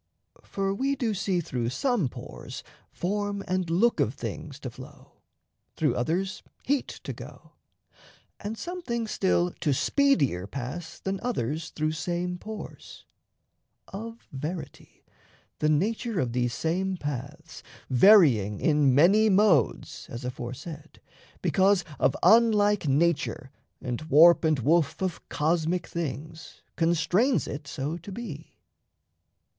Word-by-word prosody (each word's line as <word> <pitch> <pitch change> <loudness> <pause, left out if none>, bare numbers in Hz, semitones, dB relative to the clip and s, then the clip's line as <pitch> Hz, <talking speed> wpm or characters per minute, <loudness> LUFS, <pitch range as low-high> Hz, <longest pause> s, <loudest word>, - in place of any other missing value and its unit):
For 195 0 -2
we 270 +7 0
do 240 -5 -1
see 190 -2 0
Through 125 -6 -2
some 220 - 0
pores - - -9 0.3
form 205 +2 -2
and 185 -2 -1
look 210 +8 +2
of - - +1
things - - -6
to - - -5
flow, - - -14 0.5
Through 150 -6 +1
others 175 +9 -1 0.2
heat 280 0 0 0.2
to - - -5
go, - - -12 0.9
and 215 +2 -5
some 360 +6 -5
things 235 -7 -3
still 180 -2 +1
To 150 -4 +1
speedier 145 - +2
pass 140 +9 -6
than 195 0 -3
others 165 - -2
through 155 0 -1
same 175 +2 -3
pores. 215 +2 -9 0.8
Of 225 +4 -8
verity, 155 +6 -7 0.5
the 150 - +2
nature 215 +6 0
of 120 -6 -1
these 120 -1 0
same 185 +3 -1
paths, 145 +2 -6 0.3
Varying 125 - +5
in 145 -4 +3
many 200 +9 +5
modes 190 - +2
(as 120 +2 -7
aforesaid) 140 +5 -7 0.4
Because 195 -2 +3
of - - +2
unlike 210 -5 +5
nature 145 -1 +1 0.3
and 125 -2 -4
warp 165 +5 +7
and 155 -2 +3
woof 150 +4 +2
Of 185 -2 -4
cosmic 165 +3 0
things, 160 0 -6
constrains 175 - +2
it 140 0 -6
so 145 +4 -3
to 175 +4 -10
be. 185 -8 -8
170 Hz, 125 wpm, -27 LUFS, 145-205 Hz, 0.9 s, warp